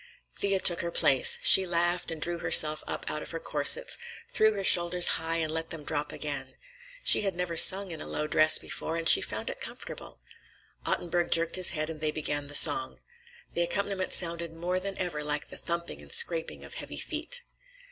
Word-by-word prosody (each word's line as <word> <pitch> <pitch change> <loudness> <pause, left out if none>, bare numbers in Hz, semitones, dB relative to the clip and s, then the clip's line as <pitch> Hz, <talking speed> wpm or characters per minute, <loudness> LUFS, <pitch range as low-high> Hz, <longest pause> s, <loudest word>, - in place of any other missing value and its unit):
Thea 195 -1 0
took 175 -2 +3
her 170 - -5
place. 135 -5 +4
She 190 -1 +7
laughed 175 +1 0
and 165 -1 -7
drew 170 +2 -5
herself 155 -2 +4
up - - -5
out 150 - -3
of - - -10
her 165 - -7
corsets, - - +2 0.3
threw 220 0 +1
her 200 -1 -6
shoulders 175 -1 +2 0.2
high 165 +1 -2
and 160 -2 -2
let 160 0 -5
them 165 -3 -9
drop 145 0 -3
again. - - -6 0.5
She - - +5
had 195 -3 -3
never 175 -1 -5
sung 190 +3 +5
in 160 - -8
a - - -9
low 150 - -4
dress 155 +1 +4
before, 165 - -6
and 165 0 -3
she - - +8
found - - -6
it - - -10
comfortable. - - -9 0.7
Ottenburg 175 0 -2
jerked 165 0 0
his 185 -1 +3
head 155 -1 -4
and 160 -1 -9
they 155 - -1
began 145 -1 -3
the 145 0 -5
song. 295 - +3 0.5
The 170 - -2
accompaniment 190 +2 -3
sounded 170 -1 -1
more 180 +2 -4
than 195 +1 -6
ever 170 -5 -4
like 150 0 -4
the - - -10
thumping 170 0 -6
and - - -13
scraping 480 +1 +3
of - - -11
heavy - - -8
feet. - - -4
170 Hz, 200 wpm, -27 LUFS, 160-185 Hz, 0.7 s, she